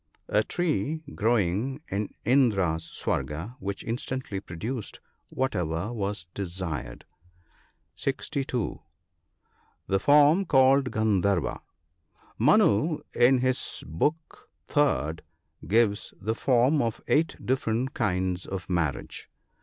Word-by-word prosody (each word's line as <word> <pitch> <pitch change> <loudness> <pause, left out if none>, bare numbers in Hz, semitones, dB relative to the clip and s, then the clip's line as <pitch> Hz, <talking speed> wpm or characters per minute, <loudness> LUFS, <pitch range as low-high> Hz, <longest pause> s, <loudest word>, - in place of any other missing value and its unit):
— - - -46
A - - +2
tree 160 -1 -1
growing 115 - +1
in 100 +2 -1 0.2
Indra's 100 -11 +2
Swarga, 85 +11 -3
which 100 0 -4
instantly 120 -2 -3
produced 105 +6 -5 0.3
whatever 95 -5 -2
was 100 -5 -3
desired. 85 -10 -4 0.9
(62.). 135 -3 -2 1.0
The 95 - +1
form 150 - +5
called 135 -2 +4
Guttdharva. 100 -5 +1 0.4
— 80 - -32
Manu, 150 +10 +4
in 125 +1 +4
his 130 0 -1
Book 150 - -2 0.3
III., 110 - +2 0.5
gives 105 -1 +1
the 110 +3 -1
form 130 +4 +3
of 115 -3 -1
eight 160 +2 +2
different 130 -1 0
kinds 95 -4 -1
of 95 -1 -5
marriage. 80 -8 -2
110 Hz, 100 wpm, -27 LUFS, 95-130 Hz, 1.0 s, form